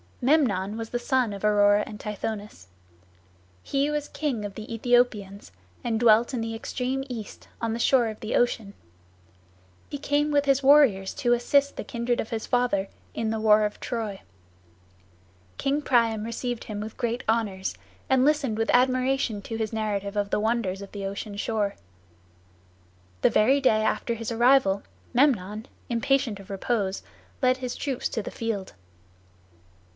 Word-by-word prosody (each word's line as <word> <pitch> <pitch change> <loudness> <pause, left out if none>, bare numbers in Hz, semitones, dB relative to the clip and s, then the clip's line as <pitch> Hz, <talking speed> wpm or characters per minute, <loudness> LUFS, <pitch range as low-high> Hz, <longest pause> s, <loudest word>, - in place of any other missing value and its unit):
Memnon 225 -8 +2
was 225 -1 -5
the 240 - -2
son 255 -3 +1
of 200 - -8
Aurora 205 0 +4
and 210 - -9
Tithonus. 210 - -5 1.0
He 280 +1 0
was 295 -1 -2
king 260 -9 -3
of 200 - -6
the 215 +2 -8
Aethiopians, 225 -4 0 0.3
and 225 -2 0
dwelt 235 +2 +4
in 245 - -1
the 225 0 -3
extreme 255 +3 -3
east, 230 -6 -8
on 230 -1 -1
the 230 - -3
shore 245 -1 +4
of 215 -1 -5
Ocean. 220 -2 0 1.2
He 285 - -5
came 290 +1 +1
with 290 -1 +2
his 275 -1 +3
warriors 265 -10 +5
to 240 - +2
assist 280 +4 +2
the - - -5
kindred 235 0 -2
of 220 - -3
his 225 -1 -3
father 245 -6 +1 0.3
in 225 -1 -2
the 220 0 -1
war 215 0 +5
of 210 0 -2
Troy. 220 -5 -4 1.4
King 280 +2 0
Priam 230 -5 +2
received 235 +1 -4
him 210 -1 -5
with 215 +1 -7
great 240 0 -2
honors, 210 -4 0 0.3
and 260 0 +4
listened 280 -7 +1
with 225 - +1
admiration 255 -3 +2
to 225 - -5
his 220 0 -3
narrative 205 -2 -2
of 205 -1 0
the - - +2
wonders 215 -3 -1
of 200 - -11
the 200 -1 -5
ocean 200 +1 -5
shore. 205 -1 -1 1.5
The - - +5
very 260 +7 +4
day 220 -5 +3
after 230 +2 0
his 230 0 -5
arrival, 235 -4 +4 0.3
Memnon, 220 -5 +1 0.2
impatient 235 -2 +1
of 195 - -13
repose, 195 -1 -1 0.4
led 255 -1 +3
his 255 -1 -4
troops 270 -4 -2
to 220 - -3
the - - -6
field. 220 -4 -4
225 Hz, 160 wpm, -26 LUFS, 210-255 Hz, 1.5 s, warriors